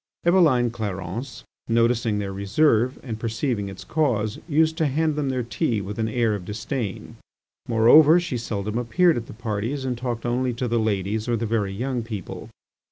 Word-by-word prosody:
Eveline 155 -10 +4
Clarence, 110 +2 -5 0.2
noticing 115 -1 +2
their 100 -1 -3
reserve 115 +5 +2
and 115 -4 -5
perceiving 115 -2 -2
its 95 - -9
cause, 115 -9 0
used 160 +1 +3
to 160 -3 +2
hand 155 +2 0
them 145 -2 -1
their 130 -1 -1
tea 120 0 -1
with 100 +2 -6
an 110 - 0
air 115 -1 +1
of 100 -3 -4
disdain. 105 +2 -5 0.5
Moreover, 145 +9 +6
she 150 -8 -3
seldom 105 0 -3
appeared 165 +9 +3
at 115 -1 -4
the - - -9
parties 115 +4 -3
and 125 -1 -1
talked 120 -1 -4
only 125 +1 0
to 125 +1 -2
the 115 0 +1
ladies 105 +1 -1
or 120 - +1
the 115 - -2
very 105 -3 0
young 125 +5 -2
people. 110 -5 -7
115 Hz, 175 wpm, -24 LUFS, 105-130 Hz, 0.5 s, Moreover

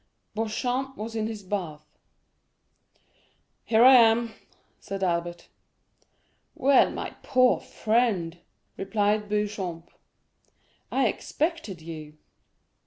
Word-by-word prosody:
Beauchamp 245 +5 -2
was 225 +2 -6
in 220 -1 -1
his 220 -2 -6
bath. 175 -6 -4 1.8
"Here 225 0 +4
I 265 - +9
am," 230 0 +4 0.6
Albert 175 -3 -2
said. - - -22 1.1
"Well, 275 0 +4
my - - -5
poor 255 -1 +3
friend," 215 -7 0 0.4
replied 205 +1 0
Beauchamp, 200 -5 -3 1.0
"I - - +2
expected 300 - -3
you." 155 -2 -9
210 Hz, 90 wpm, -26 LUFS, 175-230 Hz, 1.8 s, I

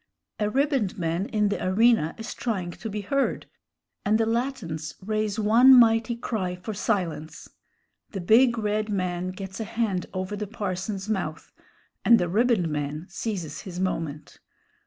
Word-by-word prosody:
A 210 -1 +1
ribboned 270 -5 +1
man 170 +3 -1
in 210 -2 +1
the 205 - -2
arena 200 -3 +3
is 225 +1 -6
trying 190 -7 -3
to 220 +6 -7
be 210 0 -4
heard, 275 +8 -1 0.6
and 215 +2 +3
the 225 - +2
Latins 225 - -2
raise 215 0 -1
one 230 +5 +7
mighty 225 -1 +5
cry 200 -6 -3
for 180 +4 -6
silence. 175 -7 -2 0.6
The 195 - -5
big 235 +6 +5
red 215 0 -1
man 185 -2 -1
gets 190 +2 -7
a - - -1
hand 210 -4 -2
over 185 +2 -3
the 210 0 -4
parson's 195 -1 -4
mouth, 185 -7 -3 0.5
and 235 - +7
the 175 - 0
ribboned 220 -2 +2
man 150 +2 -3
seizes 185 -7 -4
his 180 -2 -7
moment. 165 -5 -3
205 Hz, 155 wpm, -26 LUFS, 180-225 Hz, 0.6 s, one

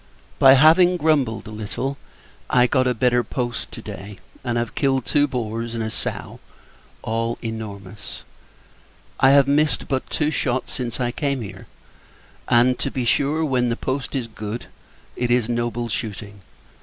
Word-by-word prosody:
By 135 0 +9
having 165 +6 +6
grumbled 145 -8 +1
a 110 - -8
little, 110 +6 -4 0.5
I 125 0 +5
got 130 0 +2
a 125 - +1
better 125 +1 +2
post 120 -2 -3
to - - -8
day; 100 +1 -8 0.3
and 120 -2 -1
have 120 -1 -2
killed 135 -3 +1
two 145 0 +3
boars 115 -2 -3
and 115 - -2
a 110 - -3
sow, - - -5 0.6
all 115 +1 -1
enormous. 105 -3 -7 1.0
I 135 - +6
have 140 0 +6
missed 150 +2 +2
but 130 -2 -2
two 150 -1 0
shot 130 -4 -1
since 120 -1 -4
I 120 -1 0
came 140 -1 -1
here; 100 - -9 0.8
and, 125 +2 +4
to - - 0
be 125 -2 -3
sure, 145 +6 +2
when 125 -4 +1
the 115 - 0
post 135 +1 -3
is 130 -3 -1
good, 110 0 -6 0.5
it 125 0 -1
is 120 -2 +2
noble 120 0 -1
shooting! 105 -3 -5
125 Hz, 160 wpm, -22 LUFS, 115-135 Hz, 1.0 s, By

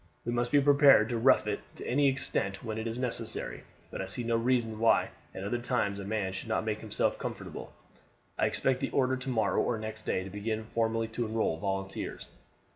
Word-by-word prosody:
We 120 - -1
must 120 0 0
be 145 - +6
prepared 140 -5 +6
to 120 -2 -1
rough 130 +4 +5
it - - -1 0.2
to - - -8
any 140 +3 +3
extent 130 -7 -1
when 110 -2 -3
it 110 - -3
is 115 +1 -3
necessary, 120 -3 -2 0.3
but - - -4
I 95 - -4
see 95 +6 0
no 115 0 +1
reason 115 -2 +1
why 115 0 +4 0.3
at 95 - -5
other 120 +5 -1
times 120 -5 -1
a - - -5
man 100 -2 -1
should 95 +4 -6
not 110 - 0
make 110 -1 -1
himself 110 -2 -1
comfortable. - - -6 0.6
I - - +2
expect 130 -1 +1
the - - -2
order 130 -1 +2
to 130 +1 -4
morrow 115 -3 +2
or 120 - 0
next 110 0 -7
day 95 - 0
to 95 - -8
begin 110 +2 -3
formally 115 0 +1
to 115 +1 -2
enroll 110 -7 0
volunteers. 95 0 -4
115 Hz, 210 wpm, -30 LUFS, 110-125 Hz, 0.6 s, be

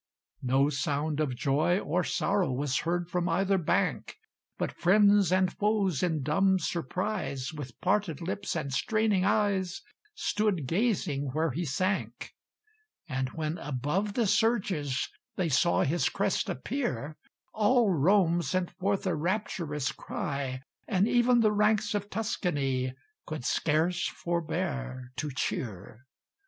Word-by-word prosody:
No 135 +2 +3
sound 145 +2 -1
of 140 -5 0
joy 145 +8 +2
or 180 -2 0
sorrow 195 -6 0
Was 130 +1 0
heard 175 +1 -1
from 180 0 -1
either 190 +3 +2
bank; 165 - 0 0.4
But - - -2
friends 200 0 +4
and 185 -1 +2
foes 205 -7 +1
in 160 -5 0
dumb 190 +7 +3
surprise, 175 -4 -3
With 145 -4 -8
parted 190 -5 +1
lips 190 +3 -3
and 140 -5 -3
straining 215 +2 +1
eyes, 200 -3 +1 0.3
Stood 210 - 0
gazing 165 - 0
where 160 0 +1
he 170 +7 -2
sank; 185 +8 -2 0.7
And 130 -3 -2
when 155 +1 -3
above 150 +10 -2
the 235 - +2
surges 190 - +1 0.3
They 180 -3 0
saw 155 +5 +3
his 165 +5 +1
crest - - 0
appear, 240 - -3 0.4
All 220 0 +3
Rome 175 +1 +3
sent 175 +4 -1
forth 195 +3 -1
a 185 - +1
rapturous 160 -4 -2
cry, 135 -2 -4 0.3
And 195 0 +2
even 240 0 +4
the 215 -2 +4
ranks 210 0 +2
of 205 0 -2
Tuscany 140 - -1 0.3
Could 155 -5 -5
scarce 165 +6 +1
forbear 155 -7 -3
to 150 - -2
cheer. 120 -2 -4
175 Hz, 130 wpm, -29 LUFS, 145-200 Hz, 0.7 s, friends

